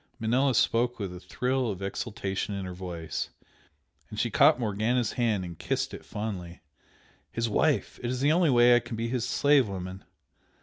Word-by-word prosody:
Manella 125 +4 +2
spoke 120 +3 +2
with 95 -4 -5
a - - -8
thrill 125 +5 -1
of 95 -3 -4
exultation 100 -1 -3
in 100 -1 -4
her 90 - -6
voice, 90 -3 -5 0.8
and - - -6
she - - 0
caught 120 - +5
Morgana's 115 +2 0
hand 110 -6 0
and 85 -3 -9
kissed - - -2
it - - -8
fondly 95 -5 -5 0.7
"His 115 0 -1
wife! 115 +1 +1
It 120 - -2
is 125 0 -2
the 145 +3 +3
only 170 0 +4
way 120 -1 +6
I - - +5
can 120 -1 -7
be 115 +1 -2
his 125 -1 -1
slave 140 -2 +4
woman! 95 0 -6
115 Hz, 180 wpm, -28 LUFS, 95-125 Hz, 0.8 s, way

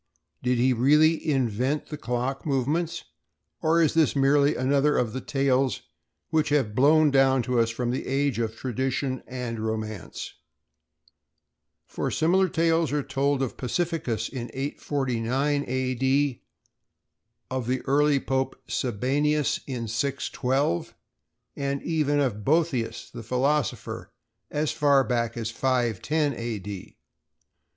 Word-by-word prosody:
Did 125 0 +1
he 125 +2 +3
really 150 +6 +3
invent 130 +1 0
the 150 - -4
clock 125 +1 -3
movements, 150 +4 -1 0.6
or 165 +1 +3
is 155 - +2
this 160 -3 +3
merely 140 +1 +4
another 140 +3 +2
of 115 -3 0
the 130 - -4
tales 135 -1 +1 0.5
which 160 -1 +2
have 135 -8 +1
blown 150 +5 +5
down 135 -2 +4
to 125 0 0
us 115 0 +3
from 120 +1 -2
this 130 - -2
age 135 -2 0
of 110 -1 -2
tradition 130 +2 -2
and 125 -3 -4
romance? 110 -2 -4 1.5
For - - -3
similar 185 +4 +2
tales 165 0 +2
are 145 -1 0
told 140 0 0
of 130 - -4
Pacificus 130 - -1
in 120 -3 -6
849 135 0 -1
A. 130 0 -1
D. 135 +1 +1 1.1
of 130 -2 -2
the 130 +1 0
early 145 +1 +3
Pope 135 0 -1
Sabinianus 140 +5 0
in 125 -4 -4
612 135 - -1 0.6
and 140 0 -2
even 150 -3 +1
of 115 -7 -1
Boetheus, 145 -5 0
the 120 - -7
philosopher, 130 +4 -1 0.4
as 150 0 -1
far 140 -3 +4
back 120 -2 -1
as 115 -1 -3
510 130 - 0
A. 115 -2 -4
D. 100 -1 -8
135 Hz, 130 wpm, -26 LUFS, 120-145 Hz, 1.5 s, blown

